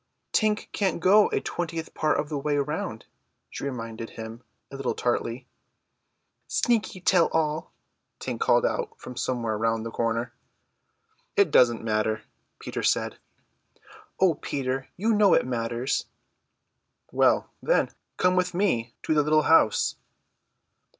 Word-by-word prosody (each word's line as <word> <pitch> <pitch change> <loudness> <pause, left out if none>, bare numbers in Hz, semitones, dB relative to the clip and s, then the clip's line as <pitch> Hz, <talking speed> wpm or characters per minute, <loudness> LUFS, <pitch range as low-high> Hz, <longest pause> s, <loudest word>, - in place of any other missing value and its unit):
"Tink 215 -1 +1
can't 190 -5 0
go 200 +5 +6
a - - 0
twentieth 165 -1 -4
part 155 - +1
of 150 - -1
the 150 -1 -3
way 145 +1 0
round," 150 +2 -3 0.5
she - - -7
reminded 115 -4 -5
him 110 +1 -8 0.3
a - - -7
little 135 -2 -2
tartly. 120 0 -1 1.0
"Sneaky 225 -5 0
tell 180 -1 +3
tale!" 155 -1 -1 0.5
Tink - - -4
called 475 +2 +3
out - - -2
from 125 - -9
somewhere 115 -4 -2
round 115 0 0
the 115 - -4
corner. 115 +1 -1 1.0
"It 200 -6 +4
doesn't 120 -4 +4
matter," 110 0 0 0.4
Peter - - -5
said. - - 0 1.0
"O 185 -3 +5
Peter, 135 -2 -3
you 220 +5 +2
know 205 -2 +5
it - - +2
matters." 120 +1 -2 1.0
"Well, - - +2
then, - - +2 0.3
come 180 0 +3
with 180 -1 0
me 125 - 0
to - - +1
the 150 - +4
little 155 +1 +3
house." 155 -10 +4
145 Hz, 135 wpm, -26 LUFS, 115-180 Hz, 1.0 s, go